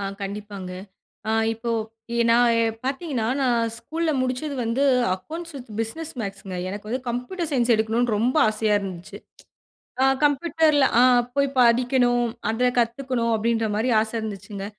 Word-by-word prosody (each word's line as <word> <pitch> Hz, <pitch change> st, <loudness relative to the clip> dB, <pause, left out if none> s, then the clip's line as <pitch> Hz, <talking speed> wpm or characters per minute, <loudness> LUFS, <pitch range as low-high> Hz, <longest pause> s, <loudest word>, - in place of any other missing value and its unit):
ஆ -, -, -4 dB, 0.2 s
கண்டிப்பாங்க. 200 Hz, -1 st, -6 dB, 0.6 s
ஆ -, -, +1 dB, 0.2 s
இப்போ 225 Hz, +1 st, -4 dB, 0.4 s
எ -, -, -1 dB
நான் 240 Hz, +1 st, +5 dB
எ -, -, +3 dB, 0.2 s
பார்த்தீங்கன்னா 270 Hz, -3 st, -2 dB
நான் 245 Hz, -3 st, +2 dB, 0.2 s
ஸ்கூல்ல 325 Hz, +6 st, -2 dB
முடிச்சது 255 Hz, +3 st, -2 dB
வந்து 235 Hz, +5 st, 0 dB, 0.3 s
"Accounts 325 Hz, -, -8 dB
with 250 Hz, -2 st, -10 dB
Business 300 Hz, +9 st, -4 dB
Maths" 200 Hz, -2 st, -5 dB
ங்க 185 Hz, -, -4 dB
எனக்கு 205 Hz, +2 st, -7 dB
வந்து 255 Hz, +3 st, -2 dB
"Computer 250 Hz, +10 st, -3 dB
Science" 250 Hz, -4 st, +1 dB
எடுக்கணும்னு 225 Hz, +1 st, +1 dB
ரொம்ப 245 Hz, +6 st, +1 dB
ஆசையா 215 Hz, 0 st, +1 dB
இருந்துச்சு. 185 Hz, -3 st, -7 dB, 0.8 s
ஆ -, -, +5 dB, 0.2 s
கம்ப்யூட்டர்ல 300 Hz, -1 st, +3 dB
ஆ -, -, +7 dB, 0.3 s
போய் 280 Hz, 0 st, +2 dB
படிக்கணும் 245 Hz, 0 st, +3 dB, 0.3 s
அத 245 Hz, +3 st, +1 dB
கத்துக்கணும் 240 Hz, 0 st, 0 dB
அப்டின்ற 225 Hz, 0 st, 0 dB
மாரி 230 Hz, +4 st, 0 dB
ஆச 220 Hz, 0 st, -2 dB
இருந்துச்சுங்க. 205 Hz, -2 st, -6 dB
240 Hz, 145 wpm, -24 LUFS, 220-265 Hz, 0.8 s, ஆ